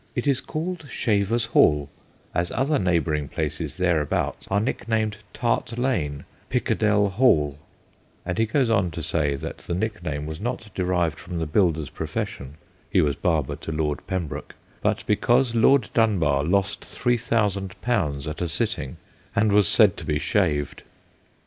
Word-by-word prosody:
It 120 Hz, -, -1 dB
is 140 Hz, -2 st, +2 dB
called 165 Hz, 0 st, -4 dB
Shaver's 115 Hz, +1 st, +1 dB
Hall, 75 Hz, -, +4 dB, 0.5 s
as 85 Hz, 0 st, 0 dB
other 145 Hz, +3 st, +1 dB
neighbour 85 Hz, -4 st, +1 dB
ing 75 Hz, -1 st, -1 dB
places -, -, -3 dB
thereabouts 85 Hz, -5 st, 0 dB
are 100 Hz, -, +2 dB
nicknamed 110 Hz, -1 st, -1 dB
Tart 115 Hz, -2 st, 0 dB
Hall, 115 Hz, -, -1 dB, 0.3 s
Pickadell 105 Hz, -2 st, +2 dB
Hall 75 Hz, -, +3 dB, 0.3 s
'; -, -, -36 dB
and 90 Hz, +2 st, -2 dB
he 115 Hz, -, +3 dB
goes 130 Hz, +3 st, +2 dB
on 105 Hz, -6 st, +2 dB
to 85 Hz, 0 st, -6 dB
say 75 Hz, -2 st, 0 dB
that 80 Hz, +4 st, -6 dB
the 85 Hz, -, -4 dB
nickname 90 Hz, -8 st, -3 dB
was 80 Hz, +3 st, -6 dB
not 115 Hz, -2 st, -4 dB
derived 90 Hz, -4 st, 0 dB
from 90 Hz, -1 st, -6 dB
the 80 Hz, -, -1 dB
builder's 80 Hz, -3 st, +1 dB
profession 70 Hz, +1 st, -4 dB, 0.3 s
he -, -, +3 dB
was 70 Hz, -2 st, +2 dB
barber 80 Hz, -5 st, 0 dB
to -, -, -6 dB
Lord 75 Hz, -1 st, -1 dB
Pembroke 95 Hz, -6 st, -4 dB, 0.3 s
but -, -, 0 dB
because 120 Hz, +3 st, +2 dB
Lord 120 Hz, +1 st, +4 dB
Dunbar 85 Hz, -12 st, +2 dB
lost 100 Hz, +3 st, +1 dB
3000 110 Hz, -6 st, 0 dB
at 75 Hz, -, -1 dB
a 90 Hz, -, 0 dB
sitting 80 Hz, -, -2 dB, 0.4 s
and 110 Hz, -2 st, +3 dB
was 100 Hz, -2 st, +5 dB
said 105 Hz, -2 st, +5 dB
to -, -, -7 dB
be 75 Hz, -2 st, +1 dB
shaved. 75 Hz, -, 0 dB
95 Hz, 155 wpm, -24 LUFS, 80-115 Hz, 0.5 s, was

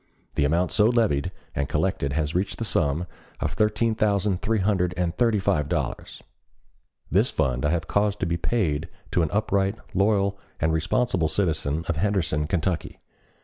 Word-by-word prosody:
The 70 Hz, -, +1 dB
amount 85 Hz, +5 st, +1 dB
so 105 Hz, -, +4 dB
levied 100 Hz, -, +1 dB, 0.2 s
and 70 Hz, -1 st, -2 dB
collected 70 Hz, -1 st, 0 dB
has 75 Hz, 0 st, -1 dB
reached 95 Hz, +3 st, -1 dB
the 115 Hz, -, -3 dB
sum 80 Hz, -3 st, +1 dB, 0.3 s
of 75 Hz, -, -2 dB
thirteen 110 Hz, +4 st, +1 dB
thousand 100 Hz, -3 st, +1 dB
three 110 Hz, +2 st, +1 dB
hundred 95 Hz, -3 st, +1 dB
and 85 Hz, -1 st, -1 dB
thirty 115 Hz, -3 st, +2 dB
five 95 Hz, -7 st, +1 dB
($13,335) -, -, -10 dB
dollars. -, -, -3 dB, 0.9 s
This -, -, +3 dB
fund 65 Hz, -1 st, 0 dB
I 75 Hz, -, +2 dB
have 85 Hz, 0 st, -1 dB
caused 105 Hz, 0 st, +1 dB
to -, -, +2 dB
be 85 Hz, +1 st, 0 dB
paid 85 Hz, -4 st, 0 dB
over -, -, -18 dB, 0.2 s
to 90 Hz, -, +2 dB
an 80 Hz, -, +1 dB
upright, 100 Hz, -1 st, +1 dB, 0.2 s
loyal, 100 Hz, 0 st, +2 dB, 0.2 s
and 80 Hz, 0 st, +1 dB
responsible 85 Hz, +1 st, +1 dB
citizen 80 Hz, -4 st, 0 dB
of 85 Hz, -, -1 dB
Henderson, 80 Hz, -6 st, 0 dB
Kentucky. 85 Hz, 0 st, -2 dB
90 Hz, 175 wpm, -25 LUFS, 80-105 Hz, 0.9 s, so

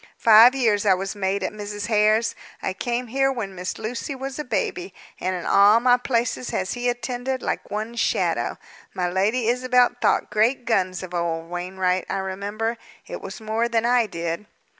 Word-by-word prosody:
Five 230 Hz, +3 st, +7 dB
years 225 Hz, -6 st, +2 dB
I 195 Hz, -3 st, +4 dB
was 195 Hz, +2 st, -4 dB
maid 195 Hz, 0 st, -1 dB
at 185 Hz, -, -2 dB
Mrs. 205 Hz, 0 st, -5 dB
Hare's. 215 Hz, +1 st, +2 dB, 0.3 s
I 190 Hz, -, -3 dB
came 240 Hz, +5 st, -2 dB
here 270 Hz, +3 st, +1 dB
when 220 Hz, -7 st, -4 dB
Miss 180 Hz, 0 st, -5 dB
Lucy 245 Hz, +6 st, -4 dB
was 270 Hz, +2 st, -6 dB
a -, -, -2 dB
baby, 185 Hz, -7 st, -3 dB, 0.2 s
and 185 Hz, 0 st, -1 dB
in 175 Hz, -, -5 dB
all 205 Hz, +3 st, +6 dB
my 245 Hz, +1 st, +5 dB
places 245 Hz, -1 st, -1 dB
has 190 Hz, 0 st, -2 dB
he 245 Hz, 0 st, -1 dB
attended, 245 Hz, +2 st, -3 dB
like -, -, -3 dB
one's 220 Hz, +3 st, -4 dB
shadow. -, -, 0 dB, 0.4 s
My 180 Hz, -1 st, 0 dB
Lady 210 Hz, +6 st, 0 dB
Isabel 250 Hz, 0 st, +3 dB
thought -, -, +1 dB
great 235 Hz, +4 st, +1 dB
guns 185 Hz, -6 st, 0 dB
of 180 Hz, -1 st, -8 dB
old 165 Hz, -1 st, -2 dB
Wainwright, 185 Hz, +1 st, -1 dB
I -, -, -1 dB
remember. 205 Hz, +4 st, -3 dB, 0.3 s
It -, -, -7 dB
was 195 Hz, +1 st, -8 dB
more 220 Hz, +2 st, -1 dB
than 230 Hz, 0 st, +1 dB
I 240 Hz, -1 st, +3 dB
did." 170 Hz, +2 st, -4 dB
215 Hz, 180 wpm, -23 LUFS, 190-245 Hz, 0.4 s, Five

